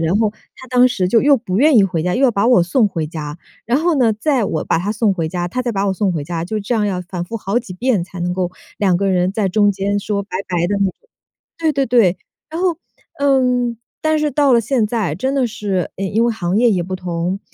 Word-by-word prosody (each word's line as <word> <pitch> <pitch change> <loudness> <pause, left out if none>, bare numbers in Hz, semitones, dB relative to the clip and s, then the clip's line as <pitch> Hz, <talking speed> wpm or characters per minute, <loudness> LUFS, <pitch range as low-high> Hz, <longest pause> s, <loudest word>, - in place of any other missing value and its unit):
然 165 +4 +1
后 215 -2 +1 0.2
她 260 - -12
当 250 0 +5
时 190 -7 -1
就 225 +3 +4
又 285 -1 +5
不 200 -5 -3
愿 295 0 +5
意 205 - +6
回 175 -4 -1
家， 180 +1 0
又 265 - 0
要 250 - +5
把 205 +1 +1
我 240 -8 +5
送 210 +6 +2
回 165 -5 -3
家。 150 -1 -6 0.3
然 245 +4 +2
后 335 +1 +1
呢， 230 -4 +3
再 260 +2 0
我 155 - -2
把 - - +1
她 185 +5 -2
送 215 -1 +1
回 165 -4 -2
家， 175 +1 -3
她 255 +8 -3
再 245 -1 -1
把 200 -1 -1
我 195 - +1
送 195 0 0
回 155 -4 -3
家， 165 0 -4
就 215 +5 -3
这 210 +4 -2
样 210 -2 +1
要 185 -2 -2
反 180 -1 -5
复 225 +6 -5
好 205 +2 -1
几 210 -7 -8
遍 235 -2 0
才 180 +1 -9
能 175 +1 -1
够 180 -1 -1 0.3
2 190 -4 +2
个 195 +1 0
人 180 0 +2
在 205 0 -1
中 205 +1 +3
间 200 +1 -1
说 200 0 -2
拜 200 - -19 0.2
拜 175 -1 0
的 205 - -1
那 200 - +2
种 190 - -1 0.6
对 320 -1 +1
对 275 -1 +1
对。 225 -7 +3 0.3
然 325 +2 -4
后， 350 -4 +1 0.4
嗯， 250 -4 +2 0.2
但 315 0 +1
是 300 -1 0
到 280 0 +3
了 235 - +4
现 230 -1 0
在， 210 -9 -1
真 265 - -2
的 260 -3 +2
是， 205 -5 -3
呃， 195 - -3
因 220 +4 +1
为 235 - +2
行 185 -2 -2
业 235 0 +4
也 180 -4 +1
不 185 +2 -5
同， 180 +1 -3
205 Hz, 280 characters per minute, -18 LUFS, 180-245 Hz, 0.6 s, 意